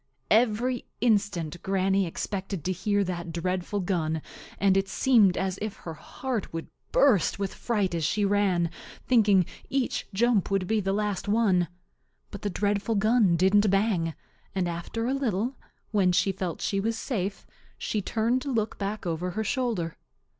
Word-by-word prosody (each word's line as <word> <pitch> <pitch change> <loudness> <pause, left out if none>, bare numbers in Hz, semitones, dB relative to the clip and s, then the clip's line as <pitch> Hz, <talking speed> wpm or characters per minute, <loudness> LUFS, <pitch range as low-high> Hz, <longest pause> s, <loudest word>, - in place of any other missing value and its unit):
Every 235 +2 +2
instant 200 -8 +1
Granny 195 0 +1
expected 190 0 -4
to 185 - +1
hear 205 +3 +1
that 175 -2 -4
dreadful 180 +4 -2
gun, 160 -4 -1 0.3
and 195 -1 +3
it 195 0 +2
seemed 220 -9 +4
as 190 0 -1
if 215 -1 -3
her 165 - -8
heart 240 +7 -4
would 165 0 -5 0.2
burst 250 - +4
with 195 -1 -3
fright 205 -6 -1
as 165 -1 -1
she 205 +6 +1
ran, 195 -4 +2 0.3
thinking 205 -7 +4 0.2
each 270 -2 -1
jump 220 0 +2
would 195 -2 +1
be 220 +3 +1
the 195 0 -1
last 205 -1 -1
one. 205 -5 +3 0.6
But 200 - -7
the 205 - -1
dreadful 205 +3 0
gun 215 -3 +4
didn't 195 +4 +4
bang, 195 -5 +1 0.4
and 185 -2 +1
after 175 +7 -3
a 255 - +1
little, 245 -2 -1 0.4
when 190 -4 +3
she 195 +2 +3
felt 185 -3 -4
she 195 - 0
was 225 +3 -1
safe, 200 -6 -3 0.3
she 210 - -2
turned 230 +5 0
to 275 - -3
look 220 -3 -1
back 200 0 -3
over 170 +1 -2
her 215 +5 -2
shoulder. 215 -8 -1
200 Hz, 160 wpm, -27 LUFS, 180-220 Hz, 0.6 s, seemed